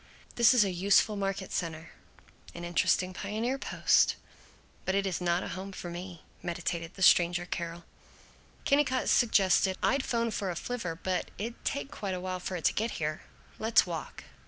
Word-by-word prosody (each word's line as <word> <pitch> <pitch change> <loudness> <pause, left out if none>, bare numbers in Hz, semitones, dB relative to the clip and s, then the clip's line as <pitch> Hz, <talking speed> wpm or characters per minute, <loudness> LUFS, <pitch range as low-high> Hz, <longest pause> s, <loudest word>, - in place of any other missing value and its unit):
"This 235 +1 +5
is 235 - +6
a 195 - -1
useful 200 +4 +3
market 195 -1 -3
center, 160 -1 -4 0.6
an 170 - -7
interesting 185 +2 +1
pioneer 220 +8 -2
post, - - +3 0.7
but 190 - 0
it 200 0 +1
is 185 -2 -2
not 175 0 +1
a - - -5
home 190 +2 -6
for 175 -2 -7
me," 175 -1 -8 0.2
meditated 170 -1 -4
the 190 - -3
stranger 175 0 +5
Carol. 170 -1 -5 0.8
Kennicott 275 -2 +2
suggested, 190 -4 +3
"I'd 275 0 +2
'phone 230 -1 0
for 200 -3 -2
a 175 - -3
flivver 185 -4 -4
but 185 +2 -2
it'd 230 +3 -6
take 280 0 -2
quite 195 -3 -4
a - - -4
while 185 0 -4
for 180 +1 -4
it 170 - -5
to - - +4
get 225 +2 -1
here. 155 0 -2 0.4
Let's 220 +1 +4
walk." 170 -3 -6
185 Hz, 175 wpm, -30 LUFS, 175-215 Hz, 0.8 s, is